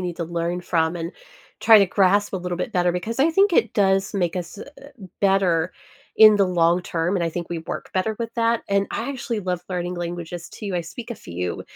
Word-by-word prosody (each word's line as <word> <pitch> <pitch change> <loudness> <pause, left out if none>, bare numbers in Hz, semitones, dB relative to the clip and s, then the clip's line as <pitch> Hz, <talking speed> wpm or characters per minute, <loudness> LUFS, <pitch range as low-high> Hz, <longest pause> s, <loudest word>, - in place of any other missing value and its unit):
need 175 -2 -4
to 170 - -3
learn 170 +1 -2
from, 165 -1 0
and 165 0 -5 0.5
try 225 -1 +8
to 200 - +4
grasp 200 +2 +2
a 190 - -1
little 180 -1 -4
bit - - -3
better, 180 -1 +2
because 215 +8 -3
I 310 +4 +4
think 390 +4 +3
it - - +2
does 195 -1 +2
make 175 -4 0
us, 175 +3 -6
uh - - -7 0.2
uh 280 - -13 0.3
better 185 -4 +2 0.4
in 215 -1 +9
the 200 -1 +3
long 175 0 +2
term, 170 +2 -1
and 180 - -1
I - - 0
think 170 +1 -5
we 170 - -3
work 160 - -7
better 210 +3 -1
with 230 -1 -5
that, 230 -1 +1
and 200 0 +1
I - - -3
actually 240 -4 -4
love 180 -3 -2
learning 180 -1 -3
languages, 175 0 -6
too, 205 -3 -7
I 175 - 0
speak 190 +9 -9
a - - -7
few, 90 - -5
180 Hz, 230 wpm, -23 LUFS, 170-205 Hz, 0.5 s, in